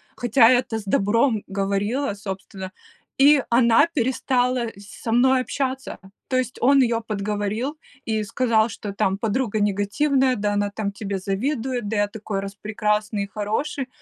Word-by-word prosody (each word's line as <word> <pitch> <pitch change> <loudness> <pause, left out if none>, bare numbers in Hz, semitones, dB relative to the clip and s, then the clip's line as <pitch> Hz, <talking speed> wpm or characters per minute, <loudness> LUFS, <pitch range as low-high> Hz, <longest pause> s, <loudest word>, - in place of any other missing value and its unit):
хотя 240 0 +4
это 245 -2 +2
с 210 - -9
добром 215 +3 +2
говорила, 200 +6 -1
собственно, 190 -1 -7 0.5
и 285 -1 +6
она 235 +5 +5
перестала 250 -1 +1
с 200 0 -13
со 225 - -2
мной 255 +2 +4
общаться. 265 0 -3 0.3
То 255 - 0
есть, 255 0 -2
он 275 +2 +5
ее 230 -2 +1
подговорил 210 +6 -2 0.3
и 220 -1 0
сказал, 225 0 +1
что, 200 -1 -6
там, 195 -1 0
подруга 220 +1 -1
негативная, 250 +7 +1
да 205 -1 -1
она, 205 0 0
там, 200 0 -3
тебе 200 -1 -4
завидует, 240 +4 -2
да 220 - -2
я 205 0 +2
такой 205 -1 -5
распрекрасный 210 +1 -2
и - - -6
хороший. 260 - -2
220 Hz, 150 wpm, -23 LUFS, 205-255 Hz, 0.5 s, и